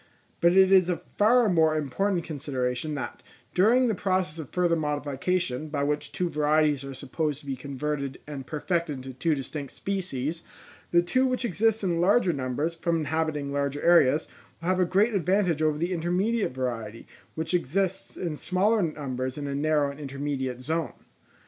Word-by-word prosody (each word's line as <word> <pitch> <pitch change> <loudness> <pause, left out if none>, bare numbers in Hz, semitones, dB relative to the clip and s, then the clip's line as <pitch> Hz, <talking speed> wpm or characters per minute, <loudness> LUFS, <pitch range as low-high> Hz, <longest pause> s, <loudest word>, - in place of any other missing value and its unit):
But 170 +1 +4
it 190 0 +6
is 185 -2 +6
a 175 - -2 0.2
far 230 +3 +5
more 160 -4 +3
important 175 +5 0
consideration, 140 -1 -3
that 140 - -5 0.3
during 230 +8 +4
the 230 - +2
process 185 -4 -1
of 150 - -7
further 175 -2 +2
modification, 150 0 -1
by 145 -2 -1
which 150 +1 -1
two 180 - -1
varieties 150 -2 +2
are 135 -1 -7
supposed 150 +2 -3
to - - -18
be 135 -1 -3
converted 140 +1 -4
and 140 -3 -7
perfected 165 0 -1
into 130 0 -8
two 150 +5 +1
distinct 140 +1 -5
species, 170 -5 -3 0.5
the 175 0 +4
two 255 +9 +2
which 255 -1 -1
exist 220 +1 +1
in 170 -3 +1
larger 190 0 +4
numbers, 140 +4 -2
from 170 0 0
inhabiting 155 -2 -1
larger 140 0 -1
areas, 165 -4 +5 0.3
will 170 +2 -3
have 185 0 +2
a 180 - +4
great 200 +6 +2
advantage 185 -3 +1
over 155 -1 +2
the 170 +4 -1
intermediate 180 - 0
variety, 115 -4 -4 0.3
which 160 +2 -3
exists 185 +3 -1
in 170 -4 -3
smaller 200 +7 +1
numbers 130 -6 -3
in 145 - -4
a 140 - -3
narrow 145 0 +1
and 140 - -12
intermediate 135 -3 -3
zone. 160 0 -2
155 Hz, 170 wpm, -27 LUFS, 140-180 Hz, 0.5 s, it